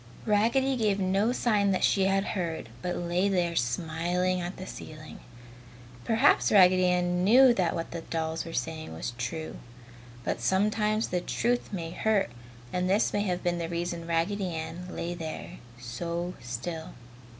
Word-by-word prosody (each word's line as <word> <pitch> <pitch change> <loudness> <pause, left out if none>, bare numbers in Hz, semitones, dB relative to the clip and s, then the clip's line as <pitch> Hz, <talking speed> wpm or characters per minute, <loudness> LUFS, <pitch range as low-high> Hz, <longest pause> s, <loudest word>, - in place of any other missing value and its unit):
Raggedy 235 +6 +2
gave 210 -3 +1
no 195 +4 +2
sign 210 -5 +2
that 190 - +1
she 195 -1 +3
had 195 0 +2
heard, 165 - -3
but 180 0 -2
lay 175 +3 +1
there 175 -3 +1
smiling 170 +8 0
at 175 +2 -5
the 185 - -7
ceiling. 155 -4 -9 0.9
Perhaps 225 0 +4
Raggedy 185 -2 +6
Ann 180 0 +1
knew 245 +5 +7
that 185 -7 0
what 165 - -4
the 170 - -4
new - - -13
dolls 160 0 -2
said 160 -1 -3
was 80 +8 -4
true. 155 +7 -4 0.7
But 115 - -2
sometimes 210 - +1
the 180 0 0
truth 240 +4 -1
may 170 -5 -4
hurt 210 - +1 0.4
and 180 0 0
this 200 +3 +2
may 205 - +1
have 180 -2 -2
been 175 -1 0
the 165 -1 -3
reason 170 0 -3
Raggedy 175 +2 0
Ann 160 +3 -5
lay 175 -1 -4
there 170 +1 -7 0.2
so 170 +9 -4
still. 135 +8 -5
180 Hz, 160 wpm, -28 LUFS, 165-200 Hz, 0.9 s, knew